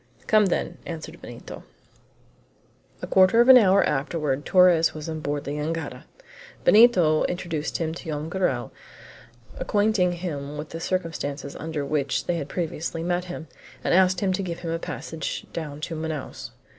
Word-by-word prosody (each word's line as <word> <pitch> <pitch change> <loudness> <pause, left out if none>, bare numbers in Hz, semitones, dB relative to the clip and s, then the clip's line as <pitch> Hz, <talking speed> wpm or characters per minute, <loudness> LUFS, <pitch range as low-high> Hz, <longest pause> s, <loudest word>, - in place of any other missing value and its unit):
"Come, 215 -2 +4
then," 180 - -2
answered 165 0 -8
Benito. 120 - -9 1.4
A - - 0
quarter 190 +4 +5
of 240 +2 +5
an 260 - +11
hour 200 -2 +5
afterward 145 -1 -1
Torres 180 -4 +5
was 155 0 -6
on 160 -1 -4
board 145 -1 -3
the 140 - -5
jangada. 160 +3 -4 0.6
Benito 185 -9 +6
introduced 170 -4 -3
him 160 -1 -2
to 175 - -9
Joam 155 -1 -3
Garral, 165 -9 -1 0.9
acquainting 205 -4 +2
him 150 -5 -5
with 150 +1 -6
the 165 - -6
circumstances 160 -6 -3
under 155 -2 -4
which 140 -2 -1
they 175 - 0
had 145 -3 -5
previously 165 0 -3
met 175 +1 -1
him, 175 -3 -7 0.4
and - - +1
asked 185 0 +4
him 190 -2 +1
to 185 - -1
give 175 -3 -5
him 165 -2 -3
a 165 - -2
passage 160 -1 -5
down 150 -3 -5
to 165 - -4
Manaos. 155 -3 -5
165 Hz, 160 wpm, -25 LUFS, 150-180 Hz, 1.4 s, an